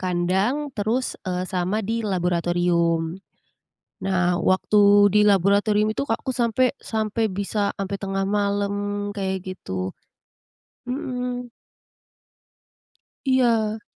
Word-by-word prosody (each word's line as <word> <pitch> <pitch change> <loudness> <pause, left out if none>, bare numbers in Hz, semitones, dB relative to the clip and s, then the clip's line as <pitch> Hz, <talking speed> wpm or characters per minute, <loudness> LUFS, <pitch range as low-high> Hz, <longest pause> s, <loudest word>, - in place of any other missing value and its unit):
kandang 190 +11 0
terus, 225 +5 -1
eee, 180 0 -2
sama 185 +2 -1
di 230 0 -1
laboratorium. 175 -3 +1 0.9
Nah, 180 -2 +1
waktu 205 +3 +4
di 210 - +6
laboratorium 205 +2 +3
itu, 220 +6 -2
Kak, 225 - -1
aku 265 - -3
sampe 235 0 +1 0.2
sampe 220 0 -1
bisa 200 +1 -1
sampe 195 0 -3
tengah 195 -1 -2
malam, 205 0 -1
kayak 190 -1 -1 0.2
gitu. 95 - -4 1.0
Hmm. 250 -1 -4 1.8
Iya. 230 -5 +2
205 Hz, 100 wpm, -23 LUFS, 185-220 Hz, 1.8 s, di